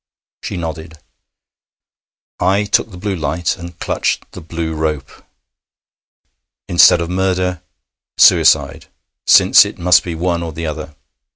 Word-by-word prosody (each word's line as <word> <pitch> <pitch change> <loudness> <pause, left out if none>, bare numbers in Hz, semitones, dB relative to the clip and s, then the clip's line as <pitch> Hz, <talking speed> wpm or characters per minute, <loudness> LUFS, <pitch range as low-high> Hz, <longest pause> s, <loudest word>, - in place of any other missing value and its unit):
She - - -6
nodded. 80 -1 -7 1.4
I 95 +3 +1
took 105 +2 0
the 90 - -12
blue 100 +1 -3
light 80 0 -2
and 85 -1 -11
clutched - - -2
the - - -10
blue 80 0 -5
rope. 75 -3 -3 1.6
Instead 85 0 +5
of 85 - -4
murder 90 -1 -1 0.6
suicide, - - +3 0.4
since - - +6
it - - -8
must 90 0 +3
be 85 -2 -5
one 85 +1 -2
or 85 -2 -6
the 85 +2 -6
other. 75 -1 -6
85 Hz, 125 wpm, -16 LUFS, 80-90 Hz, 1.6 s, since